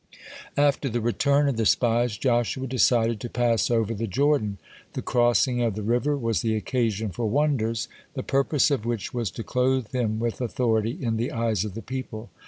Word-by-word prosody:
(13) 145 - +4
After 140 -1 0
the 120 +1 -1
return 140 +5 +2
of 135 -5 0
the 115 - +1
spies, 120 -1 +2
Joshua 125 +1 0
decided 115 -3 +2
to 120 - -6
pass 115 -7 +1
over 115 -2 +1
the 115 +1 -3
Jordan. 130 -3 +1 0.4
The - - -4
crossing 120 +1 +2
of 115 -4 0
the 105 - -4
river 125 +7 +1
was 115 -4 0
the 110 -1 0
occasion 110 -2 -1
for 115 +6 -2
wonders, 115 -4 0 0.3
the - - -3
purpose 140 +2 +2
of 135 -6 0
which 115 -5 -3
was 120 -4 -1
to 115 - -7
clothe 130 -2 0
him 110 -4 0
with 115 +1 -2
authority 115 -1 0
in 115 -3 -1
the 120 +3 -2
eyes 115 -4 0
of 105 -2 -6
the 115 - -6
people. 120 -3 -6
120 Hz, 190 wpm, -25 LUFS, 110-130 Hz, 0.4 s, 13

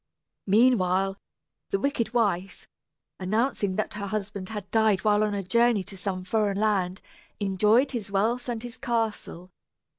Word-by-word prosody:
Meanwhile 195 -3 +3 0.5
the 395 - 0
wicked 260 -6 -1
wife, 200 -6 -1 0.5
announcing 205 0 0
that 215 - -2
her 200 -1 -5
husband 200 -2 -4
had 210 -3 -7
died 220 -3 +3
while 210 -1 +3
on 210 -1 0
a 200 - -2
journey 235 +2 +3
to 195 - -10
some 185 -1 -4
foreign 205 0 0
land, 195 -3 0 0.4
enjoyed 210 +7 +3
his 230 -6 -4
wealth 230 +6 0
and 235 -1 -3
his 245 0 -8
castle. 220 -6 -3
210 Hz, 145 wpm, -26 LUFS, 195-230 Hz, 0.5 s, Meanwhile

